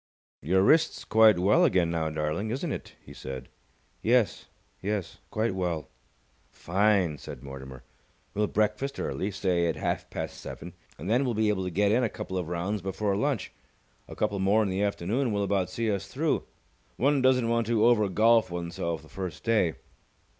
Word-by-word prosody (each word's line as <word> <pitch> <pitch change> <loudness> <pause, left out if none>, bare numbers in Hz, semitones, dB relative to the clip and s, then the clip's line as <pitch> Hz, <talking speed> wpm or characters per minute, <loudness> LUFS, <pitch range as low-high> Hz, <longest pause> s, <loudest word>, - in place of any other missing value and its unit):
"Your 95 +7 +2
wrist's 160 +9 +3
quite 110 -3 +6
well 95 +4 +4
again 90 -3 +3
now, 80 -1 -1
darling, 75 +7 -2
isn't 140 +7 -2
it?" - - -6
he - - -11
said. 65 -1 -7 0.5
"Yes. 115 -2 +2 0.3
Yes, 100 -1 -3
quite 110 -1 0
well." 85 -6 -3 0.6
"Fine!" 95 -4 +1
said - - -9
Mortimer. 65 -2 -9 0.5
"We'll 105 +1 +1
breakfast 110 +7 -1
early 100 - -2
say 90 -3 0
at 80 - 0
half - - -2
past - - -5
seven - - -8 0.2
and 80 - -7
then 120 +6 +3
we'll 125 -4 -1
be 110 0 +2
able 95 -3 0
to - - -1
get 100 +3 +2
in 120 +4 +3
a 115 - +1
couple 95 - -6
of 90 - -4
rounds 90 +4 -2
before 100 +2 -1
lunch. 135 0 -1 0.6
A - - -9
couple 100 - -1
more 100 +3 +3
in 100 - -1
the 95 +1 -1
afternoon 105 +5 0
will 100 -1 0
about 95 -2 0
see 115 +3 -1
us 100 -4 -3
through. - - -1 0.5
One 140 +2 +2
doesn't 130 -2 +3
want 115 -1 +1
to 115 -1 +3
over 110 -4 +4
golf 115 +3 +4
oneself 85 -2 -4
the - - -15
first 90 -1 -6
day." 105 -8 +2
100 Hz, 180 wpm, -28 LUFS, 85-110 Hz, 0.6 s, quite